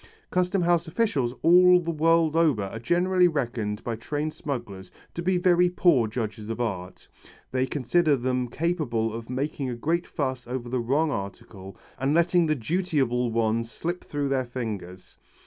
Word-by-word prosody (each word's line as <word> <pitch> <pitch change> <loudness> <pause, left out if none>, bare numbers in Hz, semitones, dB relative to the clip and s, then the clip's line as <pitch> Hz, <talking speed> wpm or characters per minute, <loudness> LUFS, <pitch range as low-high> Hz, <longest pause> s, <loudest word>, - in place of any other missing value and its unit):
Custom 180 +1 +1
House 170 0 +2
officials 160 - 0
all 180 +1 +7
the 170 -1 -3
world 165 0 +2
over 155 -11 +3
are 100 +3 -6
generally 180 +7 +3
reckoned 115 -9 -2
by 115 - -3
trained 150 +7 -3
smugglers 115 -12 -6 0.2
to 170 - -4
be 180 +1 +1
very 180 0 +4
poor 170 -10 +3
judges 110 -1 -5
of 115 - -4
art. 95 -6 -4 0.4
They 130 0 0
consider 150 +4 +2
them 125 0 -1
capable 120 -7 -1
of 115 0 -7
making 135 +1 -3
a 120 - -3
great 165 +8 -1
fuss 130 -5 -3
over 125 -1 -4
the 125 +1 -1
wrong 145 +7 +1
article 100 -3 -7 0.2
and 135 +4 +1
letting 170 0 +3
the 155 - +2
dutiable 135 -4 0
ones 115 0 0
slip 175 +7 -4
through 145 -1 -3
their 130 -2 0
fingers. 105 -7 -7
135 Hz, 165 wpm, -26 LUFS, 115-170 Hz, 0.4 s, all